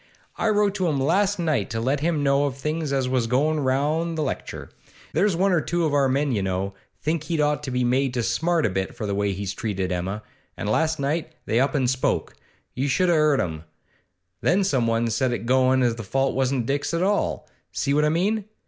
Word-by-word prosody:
I 225 Hz, -, 0 dB
wrote 205 Hz, -2 st, +2 dB
to 185 Hz, -, 0 dB
him 145 Hz, -4 st, 0 dB
last 190 Hz, +9 st, +2 dB
night 155 Hz, -, 0 dB
to 115 Hz, -, -3 dB
let 135 Hz, +5 st, 0 dB
him 155 Hz, -1 st, 0 dB
know 140 Hz, 0 st, +3 dB
of 135 Hz, -2 st, -3 dB
things 150 Hz, +1 st, -2 dB
as 135 Hz, -2 st, +1 dB
was 125 Hz, -2 st, 0 dB
goin' 150 Hz, +6 st, +1 dB
round 150 Hz, +5 st, 0 dB
at -, -, -5 dB
the 155 Hz, -, -1 dB
lecture. 135 Hz, -, -5 dB, 0.4 s
There's 200 Hz, -3 st, +2 dB
one 190 Hz, +3 st, +2 dB
or 175 Hz, -3 st, +3 dB
two 170 Hz, +1 st, 0 dB
of 150 Hz, -, 0 dB
our 140 Hz, -2 st, +3 dB
men, 140 Hz, +2 st, +1 dB
you 105 Hz, -5 st, 0 dB
know, 95 Hz, +1 st, -2 dB, 0.3 s
think 155 Hz, 0 st, -1 dB
he'd 165 Hz, -1 st, -2 dB
ought 150 Hz, -1 st, +1 dB
to 145 Hz, -, -5 dB
be 125 Hz, 0 st, 0 dB
made 130 Hz, +1 st, +1 dB
to 120 Hz, -, 0 dB
smart 165 Hz, +5 st, +1 dB
a 105 Hz, -, +1 dB
bit 95 Hz, 0 st, -3 dB
for 110 Hz, -, -4 dB
the 100 Hz, -, -2 dB
way 100 Hz, 0 st, 0 dB
he's 95 Hz, 0 st, -4 dB
treated 95 Hz, -4 st, -3 dB
Emma, 95 Hz, +4 st, -3 dB, 0.3 s
and -, -, -4 dB
last 160 Hz, +9 st, +1 dB
night 155 Hz, +3 st, -2 dB
they 115 Hz, -, +1 dB
up 135 Hz, +2 st, +1 dB
an' 135 Hz, -3 st, +2 dB
spoke 130 Hz, +1 st, 0 dB, 0.4 s
you 135 Hz, +3 st, -1 dB
should 180 Hz, +7 st, +2 dB
just 170 Hz, -, +4 dB
a' -, -, +3 dB
'eard 150 Hz, -2 st, +3 dB
them. 80 Hz, -3 st, -4 dB, 0.8 s
Then 195 Hz, +3 st, +3 dB
someone 115 Hz, -8 st, +1 dB
set 120 Hz, +2 st, +1 dB
it 120 Hz, -, -4 dB
goin' 130 Hz, +1 st, +3 dB
as 120 Hz, -2 st, +1 dB
the 115 Hz, -, -5 dB
fault 135 Hz, +7 st, 0 dB
wasn't 130 Hz, -2 st, 0 dB
Dick's 145 Hz, +5 st, -1 dB
at 170 Hz, -, 0 dB
all. 205 Hz, +2 st, 0 dB, 0.2 s
See 140 Hz, -, -1 dB
what 150 Hz, +1 st, +3 dB
I 150 Hz, -, +3 dB
mean? 195 Hz, +6 st, 0 dB
140 Hz, 235 wpm, -24 LUFS, 120-160 Hz, 0.8 s, just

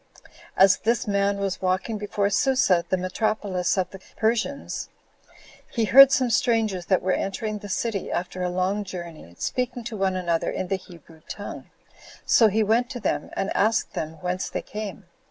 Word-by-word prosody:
As 195 Hz, 0 st, +6 dB
this 230 Hz, 0 st, 0 dB
man 200 Hz, 0 st, +1 dB
was 195 Hz, -1 st, -3 dB
walking 190 Hz, +4 st, -1 dB
before 205 Hz, -1 st, -1 dB
Susa, 205 Hz, -8 st, +3 dB
the 185 Hz, -, +2 dB
metropolis 185 Hz, 0 st, -1 dB
of 185 Hz, -, 0 dB
the 195 Hz, -, -10 dB, 0.2 s
Persians, 235 Hz, +5 st, -1 dB, 0.8 s
he 230 Hz, -2 st, 0 dB
heard 270 Hz, +6 st, +9 dB
some 255 Hz, -3 st, +2 dB
strangers 220 Hz, -7 st, +1 dB
that 185 Hz, -, +2 dB
were 185 Hz, -, +1 dB
entering 210 Hz, +3 st, -2 dB
the 205 Hz, -, -9 dB
city, 200 Hz, +1 st, -2 dB
after 185 Hz, +1 st, -3 dB
a 180 Hz, -, 0 dB
long 185 Hz, +3 st, 0 dB
journey, 170 Hz, -, -9 dB
speaking 250 Hz, -1 st, -2 dB
to 225 Hz, 0 st, -6 dB
one 190 Hz, -2 st, 0 dB
another 170 Hz, -3 st, 0 dB
in 185 Hz, -, -3 dB
the 195 Hz, -, +1 dB
Hebrew 170 Hz, -3 st, -16 dB
tongue; -, -, -7 dB, 0.6 s
so 225 Hz, -, +6 dB
he 215 Hz, +1 st, +2 dB
went 230 Hz, +4 st, +2 dB
to 250 Hz, -, -5 dB
them, -, -, -2 dB
and 195 Hz, -, -2 dB
asked 220 Hz, +2 st, +1 dB
them 155 Hz, 0 st, -4 dB
whence 180 Hz, +1 st, -2 dB
they -, -, -4 dB
came. 210 Hz, -2 st, -7 dB
200 Hz, 175 wpm, -25 LUFS, 185-220 Hz, 0.8 s, heard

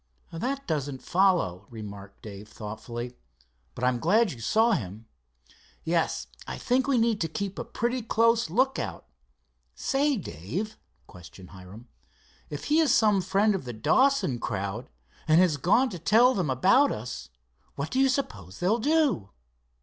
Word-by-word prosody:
"That 265 Hz, +11 st, -3 dB
doesn't 145 Hz, -4 st, -3 dB
follow," 175 Hz, -, +1 dB
remarked 100 Hz, -3 st, -10 dB
Dave 105 Hz, -1 st, -9 dB
thoughtfully, 120 Hz, +3 st, -7 dB, 0.6 s
"but 120 Hz, -, -7 dB
I'm 125 Hz, -1 st, +2 dB
glad 205 Hz, -, +3 dB
you 125 Hz, -, -9 dB
saw 220 Hz, -, +2 dB
him." 110 Hz, -, -3 dB, 0.8 s
"Yes, -, -, 0 dB, 0.2 s
I -, -, -5 dB
think 255 Hz, +2 st, +1 dB
we 275 Hz, -3 st, +2 dB
need 225 Hz, -2 st, +1 dB
to 165 Hz, -, +1 dB
keep 200 Hz, +3 st, -4 dB
a -, -, -2 dB
pretty 245 Hz, +2 st, -2 dB
close 230 Hz, -2 st, +2 dB
lookout. 260 Hz, -, -1 dB, 0.7 s
Say, 280 Hz, -, +1 dB
Dave," 175 Hz, -, -5 dB, 0.3 s
questioned 90 Hz, 0 st, -14 dB
Hiram, 95 Hz, +6 st, -12 dB, 0.6 s
"if 145 Hz, -, -6 dB
he 305 Hz, +2 st, +2 dB
is 315 Hz, -3 st, +3 dB
some 210 Hz, -3 st, +4 dB
friend 205 Hz, +3 st, +2 dB
of 190 Hz, -, -3 dB
the 120 Hz, -, -5 dB
Dawson 255 Hz, -, +2 dB
crowd, 100 Hz, +2 st, -4 dB, 0.4 s
and 155 Hz, +1 st, +5 dB
has 175 Hz, -5 st, +3 dB
gone 230 Hz, -, +2 dB
to 180 Hz, -, -6 dB
tell 230 Hz, +9 st, +5 dB
them 180 Hz, -, -1 dB
about 190 Hz, -, +4 dB
us, 120 Hz, +4 st, -6 dB, 0.5 s
what 140 Hz, +3 st, -4 dB
do 260 Hz, -, 0 dB
you 270 Hz, 0 st, +4 dB
suppose 100 Hz, -, -3 dB
they'll 200 Hz, +7 st, +1 dB
do?" 285 Hz, -, +1 dB
175 Hz, 150 wpm, -27 LUFS, -, 0.8 s, and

